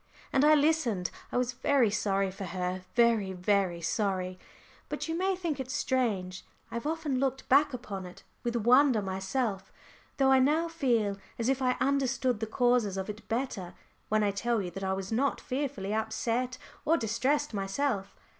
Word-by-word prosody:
And 270 - +4
I 305 +1 +7
listened. 285 - +1 0.2
I - - -1
was 250 0 0
very 255 -3 +2
sorry 195 -2 0
for 195 +1 -6
her, 185 +1 -3
very 230 -5 +3
very 180 -2 +1
sorry. 185 0 -1 0.5
But - - -3
you 325 - -2
may 380 +2 +1
think 335 -6 -3
it 260 -1 -4
strange 220 -10 -1 0.3
I - - -10
have 235 +5 -3
often 310 -5 -1
looked 270 0 -1
back 285 +2 +5
upon 200 -7 -6
it 180 - -13 0.2
with 240 -1 -2
wonder 240 0 +4
myself, 190 +2 -2 0.5
though 270 -2 +4
I 265 - +6
now 305 +6 +3
feel 240 -11 +1 0.2
as 230 +2 0
if 270 0 +1
I 250 -1 +2
understood 260 -3 +1
the 220 - -2
causes 240 -4 +2
of 190 +2 -2
it 210 +2 -14
better 225 -7 -3 0.3
when 215 0 +2
I 205 - +2
tell 235 +3 0
you 180 -3 -4
that 195 +3 -6
I 190 0 0
was 195 +1 -4
not 270 +5 +1
fearfully 255 -7 -3
upset 230 +3 -1 0.3
or 330 +2 +3
distressed 260 +5 0
myself. 200 +1 -1
235 Hz, 175 wpm, -30 LUFS, 195-270 Hz, 0.5 s, I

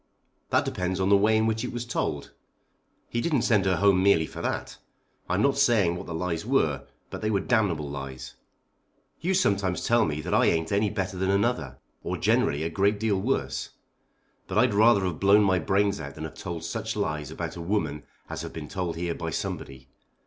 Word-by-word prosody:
"That - - +2
depends 90 +1 -2
on 95 0 +1
the 100 - +7
way 105 +2 +4
in 110 - +2
which 110 0 0
it - - -3
was 120 0 -4
told. 75 -11 -3 0.8
He 120 - -2
didn't 150 -6 +1
send 105 -4 +3
her 95 -1 +3
home 100 -1 +4
merely 95 -5 +4
for - - -8
that. - - -3 0.5
I 90 - +1
am 100 - +1
not 140 0 +2
saying 110 -10 +3
what 90 - -7
the 85 - -5
lies 85 -1 -2
were, - - 0 0.2
but - - -6
they 110 - 0
were 100 -2 +2
damnable 95 - +1
lies. 65 -2 -7 0.9
You 185 +4 0
sometimes 100 - +1
tell 120 -1 +4
me 75 -1 -2
that - - -4
I - - +4
ain't 80 +1 +1
any 100 +1 +2
better 95 -2 -3
than 95 +1 0
another, 100 - 0 0.3
or - - -3
generally 70 +2 +1
a 80 - -1
great 100 +3 +1
deal 105 -3 0
worse. 70 - -1 0.8
But 95 - -3
I'd 120 0 +4
rather 105 -1 +5
have 90 -4 -3
blown 100 +2 +5
my 95 -2 +3
brains 100 +3 +1
out 70 0 -7
than 80 - -7
have 80 - -6
told 85 -3 -6
such 85 - -4
lies 75 -2 -2
about - - -5
a 85 - -6
woman 85 -5 -1 0.3
as - - -5
have - - -7
been 80 -2 -7
told 90 -4 -3
here 85 0 -2
by 85 -1 -4
somebody. 65 -4 -5
95 Hz, 210 wpm, -26 LUFS, 80-105 Hz, 0.9 s, the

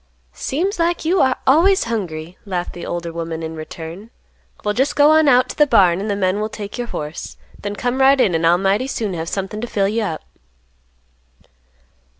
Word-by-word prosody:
"Seems 360 +7 -2
like 335 -1 0
you 350 +2 +3
are 260 -1 +2
always 350 +8 +4
hungry," 175 -7 -4
laughed 180 -4 -4
the 175 - -7
older 170 -1 -4
woman, 165 -1 -4
in 160 0 -5
return. 165 +6 -8 0.6
"Well 210 - +1
just 265 +6 0
go 295 +1 +6
on 315 -1 +5
out 255 -1 +5
to - - -6
the 295 -1 +4
barn, 185 -8 +4
and 210 - -3
the 200 - 0
men 190 0 0
will 215 +1 -2
take 210 -1 -7
your 245 -1 -4
horse; 150 -6 -6 0.2
then 205 0 -5
come 245 +4 -1
right 270 +1 +5
in 195 -8 +3
and 165 0 +2
I'll 170 +1 +5
mighty 195 +7 +1
soon 220 -7 -3
have 165 -1 -4
something 200 +2 -4
to 240 - -3
fill 200 -4 0
you 220 +3 -1
up." 165 -7 -3
205 Hz, 200 wpm, -19 LUFS, 175-260 Hz, 0.6 s, go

